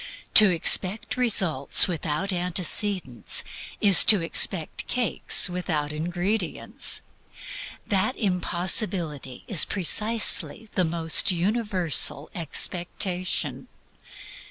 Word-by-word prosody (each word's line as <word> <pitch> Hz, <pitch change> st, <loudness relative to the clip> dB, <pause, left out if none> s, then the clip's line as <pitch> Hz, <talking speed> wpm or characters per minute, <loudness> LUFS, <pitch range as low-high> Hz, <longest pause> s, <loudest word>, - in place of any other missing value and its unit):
To 215 Hz, -2 st, +8 dB
expect 185 Hz, +4 st, 0 dB
results 190 Hz, -, +4 dB
without 170 Hz, +2 st, -4 dB
antecedents 180 Hz, -, -1 dB, 0.4 s
is 200 Hz, -4 st, +6 dB
to 210 Hz, -, +6 dB
expect 165 Hz, 0 st, -1 dB
cakes 245 Hz, -4 st, +2 dB
without 160 Hz, -5 st, -4 dB
ingredients. 175 Hz, +4 st, -3 dB, 0.8 s
That 205 Hz, +5 st, -2 dB
impossibility 175 Hz, -, -2 dB
is 195 Hz, -8 st, +6 dB
precisely 215 Hz, +3 st, -2 dB
THE 185 Hz, -, 0 dB
ALMOST 165 Hz, +1 st, +2 dB
UNIVERSAL 180 Hz, -, -1 dB
EXPECTATION. 180 Hz, +2 st, -3 dB
180 Hz, 80 wpm, -23 LUFS, 165-205 Hz, 0.8 s, To